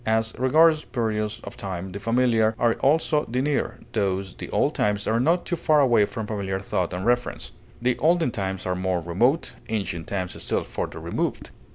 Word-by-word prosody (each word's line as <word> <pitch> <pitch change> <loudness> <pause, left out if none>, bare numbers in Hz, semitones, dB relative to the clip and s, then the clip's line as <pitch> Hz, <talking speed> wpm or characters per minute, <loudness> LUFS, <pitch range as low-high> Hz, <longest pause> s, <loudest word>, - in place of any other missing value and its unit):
As 110 0 +1
regards 155 +4 +5
periods 110 -2 -2
of - - -8
time, 95 -1 -5
the 100 - -6
familiar 115 0 +2
are 120 -1 +3
also 150 +1 +2
the 125 +2 -1
near; 145 +2 -1
thus, 95 -3 -1
the - - -8
old - - +1
times 105 0 0
are 115 +1 +1
not 165 +8 +2
too 175 - -1
far 155 -2 +3
away 120 -7 +5
for 110 - -5
familiar 100 -3 -3
thought 95 -2 -2
and 90 +2 -4
reference; 120 +1 0 0.3
the 125 0 0
olden 165 -2 +3
times 95 -3 -3
are 90 - 0
more 90 0 -1
remote, 115 - +1 0.2
ancient 95 -7 -3
times 95 -3 -4
still - - 0
further - - -5
removed. - - -3
110 Hz, 185 wpm, -25 LUFS, 95-125 Hz, 0.3 s, regards